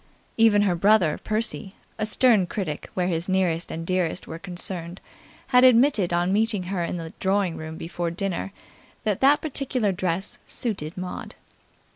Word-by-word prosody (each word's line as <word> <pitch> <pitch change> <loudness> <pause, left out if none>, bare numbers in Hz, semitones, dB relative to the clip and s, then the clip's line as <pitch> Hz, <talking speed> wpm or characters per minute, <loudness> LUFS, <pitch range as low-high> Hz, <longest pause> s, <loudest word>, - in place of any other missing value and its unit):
Even 220 -2 +5
her 195 -3 +2
brother, 175 -3 +3
Percy, 215 -2 -2 0.2
a 215 - 0
stern 220 -4 +4
critic 170 -6 -4
where 180 - 0
his 170 0 -1
nearest 180 -3 0
and 165 +1 -5
dearest 185 -1 -1
were 160 - -7
concerned, 175 -1 -4 0.5
had 250 -1 +5
admitted 245 -7 +5
on 175 +2 +1
meeting 215 -2 +1
her 175 -3 -1
in 175 - -3
the 165 -1 -7
drawing 190 -3 +1
room 160 0 -7
before 170 +1 -3
dinner 195 +2 -3 0.5
that 210 -3 -1
that 280 +2 +5
particular 260 -7 -1
dress 185 +1 -2
suited 190 -7 -2
Maud. 180 0 -6
190 Hz, 155 wpm, -24 LUFS, 170-215 Hz, 0.5 s, Even